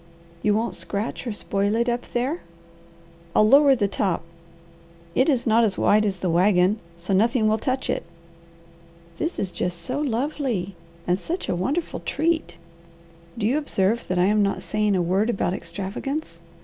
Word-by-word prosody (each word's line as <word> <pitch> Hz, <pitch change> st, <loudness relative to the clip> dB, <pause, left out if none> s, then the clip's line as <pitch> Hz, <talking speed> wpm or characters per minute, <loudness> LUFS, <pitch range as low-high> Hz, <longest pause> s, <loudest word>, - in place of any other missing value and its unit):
"You 210 Hz, -1 st, +2 dB
won't 225 Hz, +2 st, -1 dB
scratch 210 Hz, +5 st, -4 dB
or -, -, -1 dB
spoil 200 Hz, +2 st, -1 dB
it 235 Hz, +1 st, +1 dB
up 240 Hz, 0 st, -2 dB
there?" 260 Hz, +8 st, -1 dB, 0.9 s
"I'll 215 Hz, -, +6 dB
lower 275 Hz, +2 st, +7 dB
the 205 Hz, -5 st, +1 dB
top. 190 Hz, -4 st, -1 dB, 0.9 s
It 260 Hz, -, +3 dB
is 255 Hz, -4 st, +1 dB
not 230 Hz, 0 st, +4 dB
as 210 Hz, -4 st, +1 dB
wide 215 Hz, +1 st, +4 dB
as 190 Hz, -2 st, -2 dB
the 180 Hz, 0 st, -2 dB
wagon, 185 Hz, +3 st, +3 dB, 0.2 s
so 175 Hz, +3 st, -2 dB
nothing 225 Hz, +3 st, +3 dB
will 215 Hz, +1 st, +2 dB
touch 260 Hz, +3 st, -1 dB
it." -, -, 0 dB, 1.2 s
"This 330 Hz, +2 st, -2 dB
is 190 Hz, -, -2 dB
just 175 Hz, -1 st, -3 dB
so 255 Hz, +11 st, -3 dB
lovely, 250 Hz, -7 st, -1 dB, 0.3 s
and 180 Hz, +1 st, +1 dB
such 350 Hz, -, -4 dB
a -, -, +1 dB
wonderful 280 Hz, -, -2 dB
treat, 320 Hz, -, -1 dB, 0.8 s
do 220 Hz, -, -1 dB
you 260 Hz, +7 st, +2 dB
observe 230 Hz, -5 st, 0 dB
that 185 Hz, -, -1 dB
I'm 205 Hz, +4 st, +3 dB
not 200 Hz, -2 st, 0 dB
saying 210 Hz, +3 st, +1 dB
a 180 Hz, -, +2 dB
word 190 Hz, +6 st, +1 dB
about 195 Hz, -5 st, 0 dB
extravagance?" 195 Hz, -, -5 dB
215 Hz, 165 wpm, -24 LUFS, 190-255 Hz, 1.2 s, lower